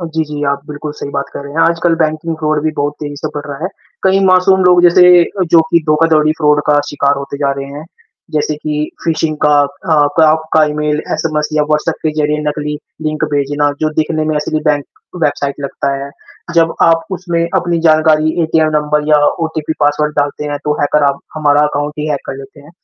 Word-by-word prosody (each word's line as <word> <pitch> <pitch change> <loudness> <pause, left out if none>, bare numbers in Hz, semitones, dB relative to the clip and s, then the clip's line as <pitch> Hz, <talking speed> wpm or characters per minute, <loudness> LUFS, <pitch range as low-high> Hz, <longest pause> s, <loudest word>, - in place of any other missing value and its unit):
अ, 170 - -4
जी, 160 - +1
जी, 150 -1 -6
आप 140 0 -2
बिल्कुल 150 0 -6
सही - - -5
बात 140 0 -2
कर - - -6
रहे 140 - -9
हैं, 165 - -1
आजकल 170 0 +2
बैंकिंग 155 +1 -2
फ़्रॉड 155 -1 -1
भी 155 - +1
बहुत 145 0 -1
तेज़ी 145 -1 -6
से - - -4
बढ़ 145 +1 -5
रहा 140 -1 -6
है। - - 0 0.3
कई 190 +1 +3
मासूम 185 +1 +4
लोग, 180 -1 +5
जैसे 175 +1 +6 0.2
अ, 190 +2 -4
जो 165 - +8
कि 170 - +5
धोखाधड़ी, 155 0 +3
फ़्रॉड 150 -1 +3
का 145 -1 +4
शिकार 140 -1 +1
होते 140 0 -7
जा 140 -1 +1
रहे 135 - -5
हैं। 150 - -8 0.5
जैसे 150 0 -1
कि 150 0 -3 0.2
फिशिंग 160 -1 -1
का 150 - +4
अ, 150 +3 -1 0.2
क - - +6
आपका 160 0 +1
ईमेल, 150 0 -1
एसएमएस 150 -2 -1
या 155 -1 +2
व्हाट्सऐप 150 +2 0
के 155 - 0
ज़रिए 150 0 0
नकली 150 0 -3 0.3
लिंक 155 0 -1
भेजना, 145 +1 0
जो 155 0 +1
दिखने 155 0 0
में 155 0 -1
असली 150 +1 -1
बैंक 145 -1 -1 0.4
वेबसाइट 140 -1 -1
लगता 140 0 -2
है। 140 +1 -6 0.4
जब 165 -1 +3
आप 165 0 +3
उसमें 175 -2 -2
अपनी 170 -1 0
जानकारी, 155 0 +3
एटीएम 160 0 +2
नंबर 150 0 -1
या 150 -1 +5 0.3
ओटीपी 160 -1 -3
पासवर्ड 150 +1 +1
डालते 145 +1 -1
हैं, 145 - -3
तो 150 - +1
हैकर 145 +1 +2
आप 140 - -7 0.2
हमारा 145 -2 +2
अकाउंट 145 0 -3
ही 150 +1 -2
हैक 145 - -1
कर 135 - -5
लेते 135 +1 -12
हैं। 145 +2 -16
150 Hz, 215 wpm, -14 LUFS, 145-160 Hz, 0.5 s, जो